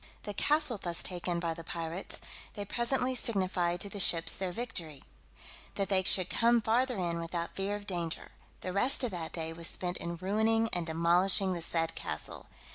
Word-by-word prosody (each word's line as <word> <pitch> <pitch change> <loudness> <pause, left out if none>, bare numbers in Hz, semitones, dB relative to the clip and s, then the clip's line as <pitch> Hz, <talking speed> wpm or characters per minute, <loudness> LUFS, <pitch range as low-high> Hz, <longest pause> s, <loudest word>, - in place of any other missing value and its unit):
The 205 - -5
castle 295 -1 +1
thus 170 -1 0
taken 175 -1 -2
by 170 -1 -1
the 165 0 -8
pirates, 165 +2 -4 0.3
they 205 - -4
presently 250 +4 0
signified 185 -7 0
to 200 - -4
the 200 - -6
ships 170 -3 +4
their 190 -2 -3
victory, 175 - -4 0.7
that 195 - -1
they 190 -2 +4
should 185 0 +4
come 235 +3 +3
farther 240 +2 +1
in 170 -2 -1
without 170 0 -4
fear 195 +1 -1
of 205 0 -7
danger: 175 -4 -3 0.3
the 185 - -4
rest 250 +7 +4
of 245 - 0
that 170 -3 -3
day 165 -1 -3
was 165 0 -4
spent 180 -1 +1
in 170 0 -4
ruining 220 +5 +1
and 175 -1 -1
demolishing 175 +4 +3
the 170 - -4
said 165 0 +2
castle. 75 - -3
185 Hz, 185 wpm, -31 LUFS, 170-210 Hz, 0.7 s, ships